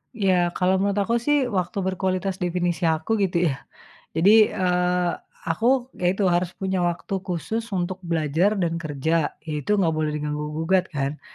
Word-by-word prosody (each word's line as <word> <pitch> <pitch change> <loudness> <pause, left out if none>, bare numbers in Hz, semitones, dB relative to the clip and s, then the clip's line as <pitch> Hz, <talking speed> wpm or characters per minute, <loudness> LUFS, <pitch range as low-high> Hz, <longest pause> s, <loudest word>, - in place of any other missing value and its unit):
Ya 185 -4 +2
kalau 185 +1 +2
menurut 200 +1 +1
aku 230 +4 0
sih, 295 +5 +2
waktu 185 +1 -2
berkualitas 190 0 -1
definisi 175 -1 0
aku 160 +8 0
gitu 175 -4 +2
ya, 135 - -4 0.6
jadi, 195 +6 +6 0.2
eee, 180 -1 +1 0.3
aku 245 +9 +1
ya 175 - +3
itu 195 +2 0
harus 175 -1 +2
punya 190 -1 -1
waktu 175 +3 -2
khusus 190 +5 -3
untuk 185 -1 -3
belajar 170 +4 +1
dan 170 -2 -1
kerja, 155 +2 -1
ya 155 - -4
itu 210 +9 +1
nggak 170 -5 +2
boleh 155 -1 0
diganggu 150 0 -3 0.2
gugat 180 +3 +1
kan, 140 -2 -3
180 Hz, 165 wpm, -24 LUFS, 165-190 Hz, 0.6 s, jadi